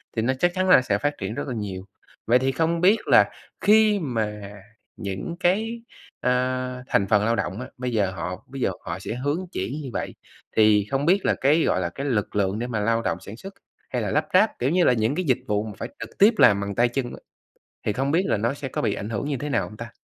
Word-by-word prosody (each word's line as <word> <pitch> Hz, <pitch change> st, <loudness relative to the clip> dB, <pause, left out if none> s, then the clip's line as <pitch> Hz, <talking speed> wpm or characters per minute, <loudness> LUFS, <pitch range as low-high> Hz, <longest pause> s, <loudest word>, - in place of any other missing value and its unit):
thì 115 Hz, -, +1 dB
nó 125 Hz, +4 st, +1 dB
chắc 175 Hz, +3 st, +3 dB
chắn 185 Hz, 0 st, +1 dB
là 180 Hz, -, +8 dB
sẽ 105 Hz, -5 st, 0 dB
phát 145 Hz, +6 st, -2 dB
triển -, -, -4 dB
rất 145 Hz, 0 st, -4 dB
là 130 Hz, -, -3 dB
nhiều. 95 Hz, -3 st, -5 dB, 0.4 s
Vậy 120 Hz, +2 st, +4 dB
thì 135 Hz, +1 st, +1 dB
không 165 Hz, +3 st, 0 dB
biết 200 Hz, +5 st, +5 dB
là -, -, +6 dB, 0.3 s
khi 215 Hz, -1 st, +5 dB
mà 110 Hz, -8 st, -2 dB, 0.6 s
những 100 Hz, -, -5 dB
cái, 220 Hz, +6 st, 0 dB, 0.4 s
à, -, -, +1 dB, 0.6 s
thành 100 Hz, -6 st, +1 dB
phần 105 Hz, 0 st, +3 dB
lao 115 Hz, +1 st, +2 dB
động 95 Hz, +3 st, -3 dB
á, -, -, -6 dB
bây 125 Hz, 0 st, -3 dB
giờ 100 Hz, -5 st, +1 dB
họ 90 Hz, +3 st, -5 dB
bây 135 Hz, 0 st, -8 dB
giờ -, -, +1 dB
họ 90 Hz, +2 st, -5 dB
sẽ 110 Hz, -, -5 dB
hướng 145 Hz, +8 st, -2 dB
chuyển 95 Hz, +8 st, -3 dB
như 135 Hz, -, -6 dB
vậy, -, -, -4 dB, 0.4 s
thì 105 Hz, -2 st, +5 dB
không 135 Hz, +1 st, 0 dB
biết 185 Hz, +4 st, +3 dB
là -, -, +3 dB
cái, 150 Hz, +4 st, +3 dB
gọi 95 Hz, -, +1 dB
là, 85 Hz, -, -1 dB
cái 135 Hz, +11 st, -6 dB
lực 115 Hz, -7 st, -1 dB
lượng 100 Hz, +1 st, 0 dB
để 120 Hz, -, -3 dB
mà 115 Hz, -3 st, -2 dB
lao 115 Hz, +2 st, +1 dB
động -, -, -1 dB
sản 110 Hz, +3 st, -10 dB
xuất 195 Hz, +7 st, -9 dB, 0.4 s
hay -, -, -2 dB
là -, -, -2 dB
lắp -, -, +1 dB
ráp, -, -, +3 dB
kiểu 125 Hz, -, +1 dB
như 180 Hz, +3 st, +3 dB
là, 125 Hz, -, +5 dB
những 115 Hz, +3 st, 0 dB
cái 185 Hz, -, -2 dB
dịch 130 Hz, -5 st, +2 dB
vụ 105 Hz, 0 st, 0 dB
mà 110 Hz, -, -6 dB
phải -, -, -5 dB
trực -, -, -9 dB
tiếp 210 Hz, +4 st, +6 dB
làm 100 Hz, -1 st, +6 dB
bằng 100 Hz, 0 st, -4 dB
tay 120 Hz, +3 st, +4 dB
chân 130 Hz, +1 st, -2 dB
á, 120 Hz, -, -8 dB, 0.7 s
thì 105 Hz, -, +2 dB
không 135 Hz, +5 st, -1 dB
biết 170 Hz, +5 st, +3 dB
là -, -, +1 dB
nó 115 Hz, +6 st, 0 dB
sẽ 140 Hz, -1 st, -6 dB
có -, -, -3 dB
bị 105 Hz, -, +1 dB
ảnh 105 Hz, -, -5 dB
hưởng 115 Hz, +7 st, -3 dB
như 140 Hz, -, -1 dB
thế 150 Hz, +4 st, -4 dB
nào 140 Hz, -, 0 dB
hông 105 Hz, -, -12 dB
ta? 115 Hz, +1 st, -8 dB
120 Hz, 265 wpm, -24 LUFS, 105-150 Hz, 0.7 s, là